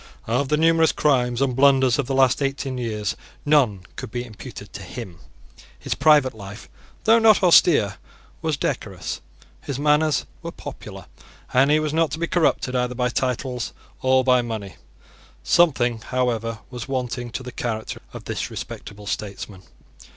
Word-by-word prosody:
Of 125 +4 0
the 150 - +2
numerous 165 0 +4
crimes 125 -3 +1
and 130 -3 0
blunders 135 -1 +4
of 135 - 0
the 135 - -1
last 130 +1 +3
eighteen 135 -1 -2
years 105 -4 -2 0.3
none 135 -10 +3 0.2
could - - -6
be 120 +2 -4
imputed 110 -4 -10
to - - -7
him. 85 -3 -8 0.6
His - - -3
private 145 -3 +4
life, 105 0 -10 0.4
though 225 +1 +6
not 220 -3 +5
austere, 150 - +5 0.4
was - - -1
decorous: - - -3 0.4
his 140 - -4
manners 150 0 +2 0.2
were - - -5
popular; - - -9 0.5
and 135 +2 +5
he 150 +1 +4
was 155 -1 -2
not 165 -1 +2
to - - -2
be 170 - -1
corrupted 160 -6 +1
either 125 0 0
by 125 0 0
titles 125 -1 -2 0.3
or 130 0 +3
by 125 -1 +4
money. 110 -5 -5 0.7
Something, 130 -9 +3
however, 115 -2 -1
was 120 -3 -6
wanting 125 -2 -3
to 130 - -4
the 125 - -7
character 110 -3 -4
of - - -9
this - - -3
respectable 105 -1 -8
statesman. 100 -2 -5
130 Hz, 160 wpm, -23 LUFS, 115-145 Hz, 0.7 s, though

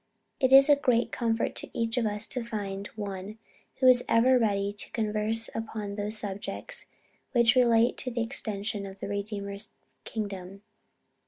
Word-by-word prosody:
It 260 -1 +2
is 270 +1 +9
a 290 - +7
great 250 -4 +1
comfort 230 -1 0
to - - -5
each 230 0 +1
of 240 -3 +1
us 210 0 -2
to 250 - -1
find 205 -3 -4
one 200 0 -6 0.4
who 260 - +3
is 250 -1 +7
ever 250 +2 +5
ready 200 -3 0
to 205 - -5
converse 220 0 0
upon 215 -2 -4
those 210 +1 -1
subjects 205 -2 -5 0.5
which 235 -2 +5
relate 235 -2 +4
to 255 - -4
the 235 -1 -1
extension 210 -4 -3
of 195 0 -11
the - - -5
Redeemer's 200 0 -4 0.3
kingdom. 195 -2 -6
215 Hz, 160 wpm, -28 LUFS, 200-235 Hz, 0.5 s, is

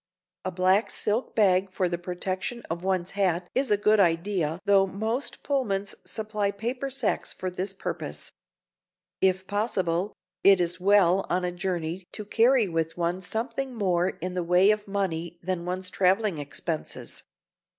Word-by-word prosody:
A 185 - -1
black 185 +4 +3
silk 220 +4 -1
bag 190 -3 +4
for 185 0 0
the 175 -1 -2
protection 185 +6 -3
of 170 +1 -3
one's 185 -1 0
hat 180 -3 0
is 265 +1 +1
a 205 - +4
good 210 +1 +4
idea 170 -2 +1
though 195 -1 +5
most 220 +8 -3
Pullmans 205 -8 -1
supply 215 -2 -2
paper 240 +7 -3
sacks 270 +1 -1
for 185 -1 -4
this 185 +2 -3
purpose. 195 - -6 0.9
If 190 0 +2
possible, 200 -3 -1 0.3
it 195 -1 +7
is 175 +1 -1
well 195 -1 +4
on 180 0 +1
a 180 - -1
journey 175 -1 -3
to 210 - -5
carry 230 +2 +4
with 165 -1 -2
one 175 +2 -1
something 240 +7 -3
more 185 -4 +2
in 180 0 -5
the 180 -1 -1
way 180 +4 +5
of 210 -1 -2
money 175 -4 -2
than 180 -1 -2
one's 185 +1 -3
traveling 190 -2 +2
expenses. 155 +3 -5
190 Hz, 155 wpm, -27 LUFS, 180-210 Hz, 0.9 s, it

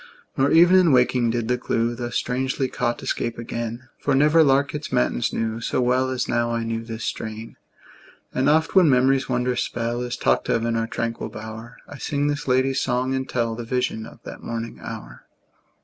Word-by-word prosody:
Nor 135 +1 +2
even 175 +4 +6
in 175 -4 +4
waking 125 -2 +3
did 115 -1 -1
the 125 +1 0
clew, 115 0 0
Thus 120 0 -5
strangely 130 +2 -1
caught, 120 -1 -2
escape 120 - -2
again; 115 +1 -5
For 140 - +1
never 150 +4 +5
lark 140 0 +2
its 150 0 -5
matins 60 0 +1
knew 115 0 -2
So - - -1
well 130 +1 +2
as 130 -1 -2
now 120 -1 +1
I 115 0 -1
knew 115 0 -3
this 115 0 -6
strain. 110 +1 -5 0.8
And 130 +3 +2
oft 160 +2 +2
when 185 -5 +6
memory's 130 0 +3
wondrous 125 0 0
spell 120 +1 -2
Is 125 0 -3
talked - - +1
of 115 - +1
in 115 0 0
our 115 0 0
tranquil 115 0 -3
bower, 110 +2 -9
I 145 - -10
sing 145 0 -1
this 145 -1 -3
lady's 130 +1 +2
song, 125 +1 0
and 130 0 -2
tell 115 -2 0
The 120 +1 -5
vision 115 -2 -2
of - - -14
that - - -9
morning 115 0 -5
hour. - - -9
125 Hz, 195 wpm, -23 LUFS, 115-135 Hz, 0.8 s, even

